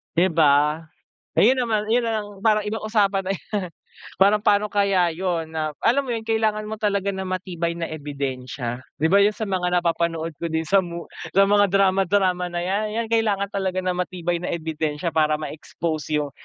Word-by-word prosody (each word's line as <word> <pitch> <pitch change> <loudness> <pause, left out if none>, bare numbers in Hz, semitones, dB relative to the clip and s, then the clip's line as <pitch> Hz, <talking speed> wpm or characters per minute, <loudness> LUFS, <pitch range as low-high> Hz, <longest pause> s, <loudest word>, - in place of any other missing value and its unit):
'di 175 +2 +4
ba. 150 -1 +4 0.6
Ayun 245 +5 +6
naman 215 -2 -1
'yun 235 +2 +2
na 225 -1 0
ang 205 -1 -10
parang 215 -2 +3
ibang 220 +1 -3
usapan 205 -3 +1
na 190 - -2
'yan, 195 0 -4 0.5
parang 205 +2 +4
pa'no 205 0 +3
kaya 200 -3 +2
'yun, 175 -2 -2
na 155 -1 -1
alam 270 +5 +2
mo 255 - -4
'yun 225 -1 -4
kailangan 215 -1 0
mo 220 - -4
talaga 200 -2 -1
ng 190 -1 -4
matibay 180 -2 -2
na 170 -1 -4
ebidensya. 130 -4 -5 0.2
'Di 160 - +3
ba 200 +4 +5
'yun 210 - +4
sa 220 - -4
mga 180 -2 +1
napapanood 165 -2 -1
ko 170 -1 -3
din 160 0 -1
sa 195 -1 +4
mo 170 -1 -7 0.2
sa 195 +1 +4
mga 205 -1 +4
drama-drama 190 -2 +2
na 175 - -2
'yan, 210 +3 -1
'yan 230 - -2
kailangan 210 -3 +1
talaga 190 -2 -2
ng 185 -1 -1
matibay 175 -1 -2
na - - -2
ebidensya 160 -1 -3
para 155 -1 +2
ma-expose 155 0 -3
'yung 145 -2 -3
185 Hz, 190 wpm, -23 LUFS, 165-205 Hz, 0.6 s, Ayun